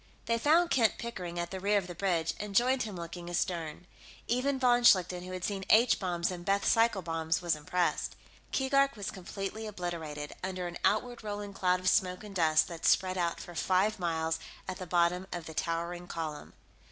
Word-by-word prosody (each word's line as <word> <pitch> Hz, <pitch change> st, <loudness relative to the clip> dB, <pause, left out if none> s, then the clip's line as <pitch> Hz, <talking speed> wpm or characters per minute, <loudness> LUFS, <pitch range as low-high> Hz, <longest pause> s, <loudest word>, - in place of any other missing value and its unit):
They 230 Hz, 0 st, +1 dB
found 330 Hz, +7 st, +4 dB
Kent 230 Hz, -4 st, +3 dB
Pickering 180 Hz, -7 st, -5 dB
at 170 Hz, 0 st, -3 dB
the 190 Hz, -, -4 dB
rear 205 Hz, +2 st, +2 dB
of 195 Hz, -, 0 dB
the 180 Hz, -, -7 dB
bridge, 170 Hz, -3 st, 0 dB
and 205 Hz, -1 st, -5 dB
joined 255 Hz, +3 st, +4 dB
him 210 Hz, -3 st, -3 dB
looking 170 Hz, 0 st, -7 dB
astern. 170 Hz, -2 st, -2 dB, 0.4 s
Even 265 Hz, +3 st, +1 dB
von 245 Hz, -1 st, +4 dB
Schlichten, 180 Hz, -5 st, +4 dB
who 185 Hz, -, -7 dB
had 185 Hz, -1 st, -5 dB
seen 195 Hz, -1 st, -2 dB
H 230 Hz, +3 st, +5 dB
bombs 175 Hz, -2 st, -1 dB
and 175 Hz, -1 st, -6 dB
Bethe 200 Hz, +2 st, +1 dB
cycle 225 Hz, -4 st, +3 dB
bombs, 165 Hz, -1 st, -1 dB
was 175 Hz, -3 st, 0 dB
impressed. 175 Hz, +4 st, -1 dB, 0.4 s
Keegark 275 Hz, 0 st, +2 dB
was 200 Hz, -3 st, -4 dB
completely 195 Hz, +3 st, -5 dB
obliterated 165 Hz, -7 st, -5 dB
under 185 Hz, -1 st, -3 dB
an 175 Hz, 0 st, -5 dB
outward 240 Hz, +3 st, +1 dB
rolling 205 Hz, -1 st, -5 dB
cloud 180 Hz, -1 st, +2 dB
of 185 Hz, -, -4 dB
smoke 185 Hz, -1 st, +2 dB
and 210 Hz, -2 st, -9 dB
dust 160 Hz, -3 st, +4 dB
that 165 Hz, -2 st, -8 dB
spread 185 Hz, 0 st, +3 dB
out 170 Hz, -2 st, -1 dB
for 175 Hz, -, -9 dB
five 190 Hz, +5 st, +1 dB
miles 160 Hz, -2 st, -1 dB, 0.3 s
at 185 Hz, -, -4 dB
the 185 Hz, -, -6 dB
bottom 175 Hz, +2 st, +2 dB
of 175 Hz, -2 st, -5 dB
the 160 Hz, -, -8 dB
towering 170 Hz, +1 st, -2 dB
column. 155 Hz, -3 st, -5 dB
185 Hz, 195 wpm, -31 LUFS, 170-210 Hz, 0.4 s, H